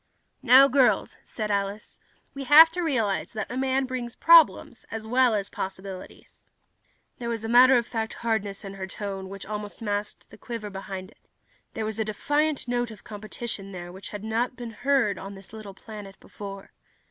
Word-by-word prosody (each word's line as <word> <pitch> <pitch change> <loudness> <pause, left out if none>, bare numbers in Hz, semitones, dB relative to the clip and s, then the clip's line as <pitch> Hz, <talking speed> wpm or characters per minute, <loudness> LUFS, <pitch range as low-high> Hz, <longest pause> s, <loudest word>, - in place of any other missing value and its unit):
"Now, 265 +1 +8
girls," 265 -1 +2
said 215 -2 -4
Alice, 200 +1 -3 0.3
"we 275 -1 -6
have 315 +5 +9
to 355 +2 -3
realize 230 - -1
that 215 0 -4
a - - -4
man 265 +1 +1
brings 255 -2 -5
problems, 330 -7 +5
as 225 -1 -6
well 245 0 +3
as 200 -1 -1
possibilities." 190 -1 -8 0.7
There 235 -1 -4
was 225 -1 -3
a - - -2
matter 250 +3 +7
of 235 - 0
fact 225 -2 -3
hardness 205 -3 -1
to 200 -2 -7
her 195 -1 -6
tone 195 -1 -6
which 195 0 -8
almost 210 0 -6
masked 205 -2 -4
the 210 - -14
quiver 230 -4 -6
behind 190 -1 -7
it. - - -29 0.5
There 220 - -2
was 220 0 -4
a - - +2
defiant 290 +7 0
note 245 0 -1
of 220 -3 -12
competition 210 -1 -6
there 175 -1 -7
which 190 +2 -9
had 210 -1 -7
not 230 +3 -1
been 240 -2 -7
heard 245 -3 +1
on 195 +1 -8
this 195 +2 -12
little 210 -3 -9
planet 205 -2 -10
before. 195 -1 -9
220 Hz, 180 wpm, -26 LUFS, 200-245 Hz, 0.7 s, have